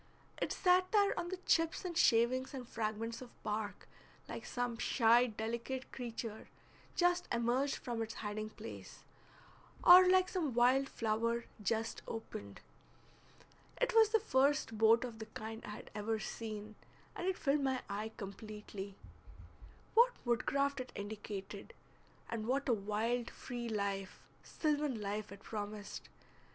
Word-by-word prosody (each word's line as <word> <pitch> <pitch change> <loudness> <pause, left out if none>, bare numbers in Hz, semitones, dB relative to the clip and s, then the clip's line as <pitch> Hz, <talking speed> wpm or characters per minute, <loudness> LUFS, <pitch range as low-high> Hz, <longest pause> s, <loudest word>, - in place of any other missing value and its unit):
It - - 0
sat 365 0 +3
there 405 -2 +4
on 345 0 -3
the 375 - -3
chips 330 +3 +2
and 350 -2 -3
shavings 255 0 +3
and 250 -3 -6
fragments 225 +1 -3
of 250 - -9
bark 210 0 -3 0.4
like - - -6
some 245 -1 -2
shy 240 0 +5
delicate 235 +4 -4
creature 230 -3 -5 0.5
just 355 0 +2
emerged 240 +4 +1
from 235 -2 -4
its 225 0 -4
hiding 215 0 -4
place, 220 +1 -10 0.8
or 365 +1 +10
like 370 0 +5
some 325 - -2
wild 255 +3 +4
flower 230 +1 0 0.2
just 225 +2 -1
opened. 100 - -7 1.2
It - - +2
was 445 -2 +7
the 445 0 +4
first 275 - +2
boat 225 +2 +5
of 235 -3 -6
the 220 - -6
kind 220 +1 -7
I - - -7
had 210 - -8
ever 215 +2 -1
seen, 215 -1 -5 0.4
and 355 - -3
it 380 - +1
filled 285 0 +2
my 265 -2 0
eye 210 +2 -3
completely. 200 -1 -7 1.0
What 485 +2 +6
woodcraft 275 +4 +1
it 255 - -5
indicated, 205 -1 -6 0.5
and 220 -1 -4
what 275 +4 0
a 245 - +4
wild 225 +3 -1
free 240 -2 -6
life, 200 -3 -2 0.2
sylvan 295 -5 -1
life, 210 0 -3
it 200 +1 -11
promised! 210 -1 -6
230 Hz, 140 wpm, -35 LUFS, 215-275 Hz, 1.2 s, or